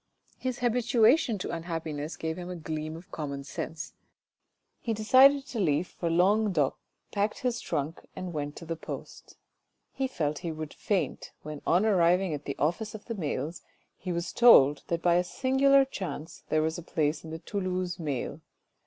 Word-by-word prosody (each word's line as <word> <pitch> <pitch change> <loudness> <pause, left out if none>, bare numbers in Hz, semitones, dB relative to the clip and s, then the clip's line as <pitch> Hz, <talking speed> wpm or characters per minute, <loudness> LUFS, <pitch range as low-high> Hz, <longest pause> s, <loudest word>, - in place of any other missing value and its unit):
His 255 -1 -2
habituation 240 +1 +3
to 185 - -4
unhappiness 165 -2 -4
gave 160 0 -3
him 180 0 -7
a 180 - -4
gleam 155 -1 -4
of 175 - -14
common 140 -3 -4
sense, 150 +3 -6 0.9
he 225 -2 -2
decided 270 +6 +6
to 235 - -5
leave 160 -3 +2
for 170 - -3
Languedoc, 180 -3 +3 0.4
packed 205 +1 -1
his 245 -2 -1
trunk 155 0 -3
and 185 -2 -5
went 145 -1 -3
to 165 - -9
the 165 0 -3
post. 160 - -9 0.6
He 270 -1 -1
felt 150 - -2
he 170 -2 -3
would 155 -1 -6
faint, 200 -4 -2
when 150 -1 -7
on 180 +5 +4
arriving 180 -3 +3
at 145 0 -5
the 140 - -4
office 175 +9 -1
of 210 - -10
the 230 - -4
mails, 155 - -3 0.3
he 185 - -5
was 170 0 -3
told 150 - +7
that 170 -1 -2
by 175 -1 +4
a 180 - +3
singular 270 +6 +4
chance 175 - -6
there 155 0 +2
was 160 +2 -1
a - - -7
place 155 -1 -1
in 160 - -8
the 160 - -5
Toulouse 185 0 -3
mail. 145 -6 -3
175 Hz, 175 wpm, -29 LUFS, 155-215 Hz, 0.9 s, told